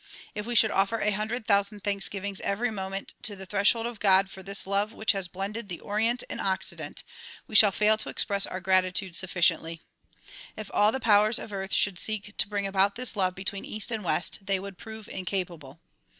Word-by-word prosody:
If 210 Hz, +1 st, -6 dB
we 240 Hz, -, -3 dB
should 220 Hz, -1 st, +5 dB
offer 195 Hz, +4 st, +1 dB
a 210 Hz, -, +1 dB
hundred 215 Hz, +3 st, -3 dB
thousand 200 Hz, 0 st, +2 dB
thanksgivings 200 Hz, -1 st, -2 dB
every 220 Hz, +4 st, -1 dB
moment 195 Hz, -1 st, -5 dB
to 210 Hz, -, -1 dB
the 190 Hz, 0 st, -8 dB
threshold 205 Hz, +4 st, +2 dB
of 235 Hz, -3 st, -6 dB
God 195 Hz, -1 st, +4 dB
for 190 Hz, -, -10 dB
this 195 Hz, +1 st, -2 dB
love 200 Hz, +3 st, -1 dB
which 220 Hz, -, +2 dB
has 195 Hz, -3 st, -2 dB
blended 200 Hz, +4 st, -5 dB
the 175 Hz, -, -6 dB
Orient 225 Hz, +4 st, -1 dB
and -, -, -5 dB
Occident 190 Hz, -1 st, -1 dB, 0.4 s
we -, -, -14 dB
shall 205 Hz, -1 st, +8 dB
fail 215 Hz, +2 st, +3 dB
to -, -, -3 dB
express 200 Hz, -1 st, +1 dB
our 185 Hz, -, -5 dB
gratitude 185 Hz, 0 st, +2 dB
sufficiently. 170 Hz, -3 st, +1 dB, 0.8 s
If 215 Hz, -2 st, -8 dB
all 210 Hz, +1 st, +4 dB
the 265 Hz, -, -3 dB
powers 215 Hz, -1 st, +4 dB
of 210 Hz, -, -6 dB
earth 195 Hz, 0 st, -4 dB
should 190 Hz, -4 st, +3 dB
seek 210 Hz, +1 st, -4 dB
to -, -, +1 dB
bring 205 Hz, -1 st, -2 dB
about 195 Hz, 0 st, +2 dB
this 250 Hz, -1 st, -3 dB
love 185 Hz, -2 st, +1 dB
between 195 Hz, +1 st, -4 dB
east 215 Hz, +2 st, -5 dB
and 220 Hz, -2 st, -3 dB
west 175 Hz, -, 0 dB
they 195 Hz, -1 st, 0 dB
would 195 Hz, -1 st, -9 dB
prove 220 Hz, -1 st, -9 dB
incapable. 175 Hz, -6 st, -5 dB
200 Hz, 200 wpm, -27 LUFS, 190-215 Hz, 0.8 s, shall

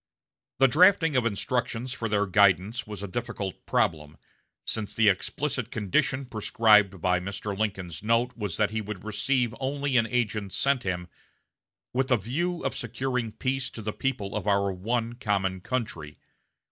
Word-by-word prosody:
The 135 Hz, -, +6 dB
drafting 165 Hz, +1 st, +5 dB
of 125 Hz, -2 st, +3 dB
instructions 120 Hz, +3 st, -2 dB
for 115 Hz, -2 st, -3 dB
their 105 Hz, -1 st, +2 dB
guidance 100 Hz, +3 st, +3 dB
was 105 Hz, -2 st, -7 dB
a -, -, -3 dB
difficult 100 Hz, -2 st, -5 dB
problem, 75 Hz, -2 st, 0 dB, 0.5 s
since 110 Hz, -2 st, 0 dB
the 110 Hz, -2 st, +5 dB
explicit 125 Hz, +6 st, -1 dB
condition 110 Hz, +6 st, 0 dB
prescribed 105 Hz, -4 st, +3 dB
by 90 Hz, 0 st, +2 dB
Mr. 100 Hz, +2 st, -4 dB
Lincoln's 95 Hz, -6 st, -3 dB
note 115 Hz, +3 st, +1 dB
was 105 Hz, -7 st, -4 dB
that 105 Hz, -1 st, +2 dB
he 110 Hz, 0 st, -2 dB
would 105 Hz, -3 st, -7 dB
receive 120 Hz, +3 st, 0 dB
only 140 Hz, 0 st, 0 dB
an 115 Hz, -1 st, +3 dB
agent 110 Hz, -5 st, -1 dB
sent 140 Hz, -2 st, +2 dB
him 90 Hz, -2 st, -3 dB, 0.9 s
"with 130 Hz, +1 st, +1 dB
the 125 Hz, -3 st, +3 dB
view 170 Hz, -, -2 dB
of -, -, -1 dB
securing 125 Hz, -4 st, -2 dB
peace 130 Hz, +3 st, -1 dB
to 110 Hz, -, -9 dB
the 105 Hz, 0 st, -3 dB
people 120 Hz, -7 st, -2 dB
of -, -, -3 dB
our 100 Hz, -1 st, +2 dB
one 115 Hz, +5 st, -2 dB
common 100 Hz, -6 st, -1 dB
country." 95 Hz, -, -4 dB
110 Hz, 160 wpm, -27 LUFS, 100-125 Hz, 0.9 s, The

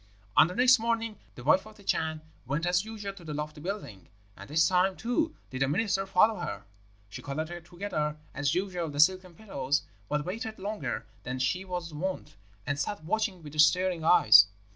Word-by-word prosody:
"On -, -, +7 dB
the 180 Hz, -, -7 dB
next 250 Hz, +1 st, +6 dB
morning 230 Hz, -1 st, -1 dB, 0.2 s
the 125 Hz, -, -10 dB
wife 185 Hz, -, +3 dB
of 215 Hz, -, -14 dB
the 200 Hz, -, -16 dB
Chan 160 Hz, -4 st, -1 dB, 0.3 s
went 150 Hz, +6 st, -1 dB
as 180 Hz, +2 st, +2 dB
usual 210 Hz, -2 st, -6 dB
to 190 Hz, -3 st, -14 dB
the 155 Hz, -2 st, -5 dB
lofty 150 Hz, 0 st, -5 dB
building, 170 Hz, -, -6 dB, 0.3 s
and -, -, -12 dB
this 160 Hz, +2 st, +4 dB
time, 185 Hz, +1 st, +2 dB
too, 310 Hz, +7 st, -1 dB, 0.2 s
did 130 Hz, 0 st, -5 dB
the 135 Hz, -, +3 dB
minister 195 Hz, +5 st, 0 dB
follow 205 Hz, +2 st, +3 dB
her. 175 Hz, -, -5 dB, 0.4 s
She 100 Hz, -, -9 dB
collected 160 Hz, +4 st, -5 dB
together, 170 Hz, -5 st, -3 dB, 0.2 s
as 145 Hz, -1 st, 0 dB
usual, 180 Hz, -3 st, -2 dB
the 145 Hz, 0 st, -6 dB
silken 185 Hz, +2 st, +3 dB
pillows, 145 Hz, -8 st, -1 dB, 0.3 s
but 150 Hz, 0 st, -1 dB
waited 220 Hz, +4 st, -5 dB
longer 190 Hz, -, -4 dB, 0.2 s
than 125 Hz, +1 st, -4 dB
she 130 Hz, +9 st, 0 dB
was 175 Hz, -3 st, -5 dB
wont, 185 Hz, +5 st, -4 dB, 0.3 s
and 145 Hz, 0 st, -2 dB
sat 205 Hz, -1 st, -3 dB
watching 200 Hz, 0 st, -1 dB
with 150 Hz, 0 st, +1 dB
staring 175 Hz, +2 st, +3 dB
eyes. 110 Hz, -, +8 dB
175 Hz, 185 wpm, -29 LUFS, 150-200 Hz, 0.4 s, eyes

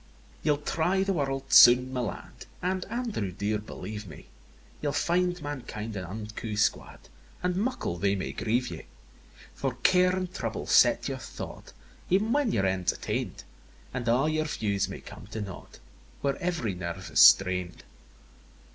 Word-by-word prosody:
II. 65 Hz, 0 st, -28 dB
Ye'll 150 Hz, -1 st, +2 dB
try 170 Hz, +6 st, 0 dB
the 195 Hz, 0 st, 0 dB
world 135 Hz, -4 st, -2 dB
soon, 125 Hz, +2 st, +8 dB
my 130 Hz, -, -1 dB
lad, 115 Hz, -5 st, -6 dB
And, 185 Hz, +1 st, -1 dB
Andrew 225 Hz, -, -3 dB
dear, 105 Hz, +3 st, -1 dB
believe 105 Hz, 0 st, -7 dB
me, 80 Hz, -, -12 dB, 0.5 s
Ye'll 145 Hz, -2 st, -1 dB
find 180 Hz, +1 st, +1 dB
mankind 115 Hz, -7 st, -5 dB
an 95 Hz, -2 st, -4 dB
unco 105 Hz, +3 st, -6 dB
squad, 105 Hz, -, 0 dB, 0.4 s
And 180 Hz, 0 st, 0 dB
muckle 210 Hz, -, -2 dB
they 100 Hz, +2 st, +1 dB
may 95 Hz, -, -3 dB
grieve 120 Hz, +2 st, -1 dB
ye: -, -, -8 dB, 0.7 s
For 135 Hz, -3 st, -3 dB
care 180 Hz, 0 st, +4 dB
and 185 Hz, -1 st, -3 dB
trouble -, -, -4 dB
set -, -, +4 dB
your -, -, -4 dB
thought, -, -, -9 dB, 0.4 s
Ev'n 205 Hz, +5 st, +3 dB
when 285 Hz, -3 st, +2 dB
your 95 Hz, -, +1 dB
end's 95 Hz, -1 st, +1 dB
attain'd; -, -, -4 dB, 0.5 s
And 125 Hz, -2 st, -4 dB
a' 125 Hz, +6 st, +3 dB
your 155 Hz, 0 st, 0 dB
views 100 Hz, -, -1 dB
may -, -, -7 dB
come -, -, -11 dB
to 110 Hz, +1 st, -6 dB
nought, 100 Hz, -3 st, -8 dB, 0.4 s
Where 140 Hz, -1 st, 0 dB
ev'ry 170 Hz, -, -1 dB
nerve 85 Hz, -2 st, -6 dB
is -, -, +2 dB
strained. 90 Hz, -2 st, +5 dB
125 Hz, 160 wpm, -28 LUFS, -, 0.7 s, soon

